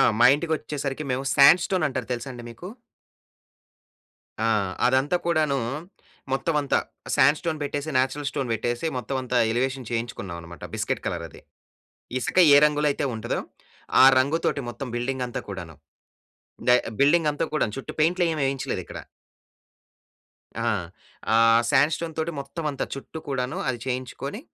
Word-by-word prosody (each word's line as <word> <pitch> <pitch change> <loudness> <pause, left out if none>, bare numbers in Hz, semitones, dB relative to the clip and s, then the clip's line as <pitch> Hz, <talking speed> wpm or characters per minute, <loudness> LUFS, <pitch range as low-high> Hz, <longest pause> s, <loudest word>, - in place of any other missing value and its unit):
ఆ! - - +6 0.2
మా 120 - +8
ఇంటికొచ్చేసరికి 150 -2 -3
మేవు 130 +2 -2
శాండ్ 155 +5 +7
స్టోనంటారు 145 -10 -1
తెలుసా 120 +2 -4
అండి 120 -1 -9
మీకు? 175 +10 -9 1.8
ఆ! - - +2 0.4
అదంతా 130 +6 +2
కూడానూ 155 -5 +2 0.7
మొత్తమంతా 145 +1 +1 0.4
శాండ్ 145 +3 +5
స్టోన్ 165 -3 -3
పెట్టేసి, 145 +1 -3
న్యాచురల్ 135 +3 0
స్టోన్ 135 -3 -3
పెట్టేసి, 120 +6 -2
మొత్తవంతా 125 0 -1
ఎలివేషన్ 130 +1 -1
చేయించుకున్నావనమాట, 90 -8 -5
బిస్కెట్ - - -2
కలరది. - - -5 0.8
ఇసక 125 - -4 0.2
ఏ - - +9
రంగులో 150 0 +2
అయితే 140 - -2
ఉంటదో, 110 +2 -2 0.6
ఆ - - +10
రంగుతోటి 140 +1 0
మొత్తం 120 +3 -6
బిల్డింగంతా 125 0 -2
కూడాను. 90 -5 -7 0.9
దా 125 - +8 0.2
బిల్డింగంతా 150 +1 +3
కూడాను 115 -8 0
చుట్టూ 135 - -6
పెయింట్‌లేవేయించలేదిక్కడ. 155 -5 0 1.7
ఆ! - - +3 0.7
ఆహ్, 115 +1 +5
శాండ్ 145 +4 +4
స్టోన్‌తోటి 160 0 -3
మొత్తమంతా 145 0 -3
చుట్టూ 135 +3 -8
కూడాను 135 +4 -2
అది 125 -2 -1
చేయించుకోని, 130 - -4
135 Hz, 115 wpm, -25 LUFS, 125-150 Hz, 1.8 s, ఆ